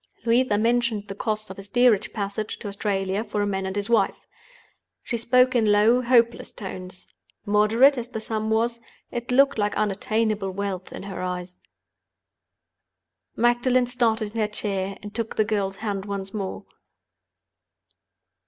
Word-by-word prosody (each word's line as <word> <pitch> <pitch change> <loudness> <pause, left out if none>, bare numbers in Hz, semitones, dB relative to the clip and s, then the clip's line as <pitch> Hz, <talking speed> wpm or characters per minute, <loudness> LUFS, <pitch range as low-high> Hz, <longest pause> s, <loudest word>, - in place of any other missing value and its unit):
Louisa 235 -2 +3
mentioned 230 -2 +1
the 195 - -5
cost 215 0 -3
of 190 - -9
a - - -5
steerage 220 +1 +2
passage 205 0 -4
to - - -7
Australia 200 0 -1
for 210 -3 -2
a - - +1
man 190 -1 -2
and 190 - -4
his 205 -1 -2
wife. 225 -4 +1 0.8
She 240 - -3
spoke 250 +2 +3
in 220 -3 +3
low, 220 +4 +4
hopeless 235 -1 +2
tones. 185 -3 -8 0.4
Moderate 225 +7 +4
as 235 - -5
the 225 - -5
sum 220 0 -3
was, 230 +2 +1 0.3
it 240 0 -5
looked 275 0 +4
like 205 0 0
unattainable 215 0 0
wealth 190 -1 -4
in - - -7
her 195 -2 -6
eyes. 180 0 -4 1.8
Magdalen 245 +2 +3
started 230 -3 0
in 225 - -1
her 210 - +2
chair, 195 -2 -2
and 205 0 -8
took 230 -1 -3
the 215 - +2
girl's 200 -3 -1
hand 200 -2 -2
once 195 -1 -5
more. 195 -3 -4
215 Hz, 155 wpm, -24 LUFS, 200-235 Hz, 1.8 s, low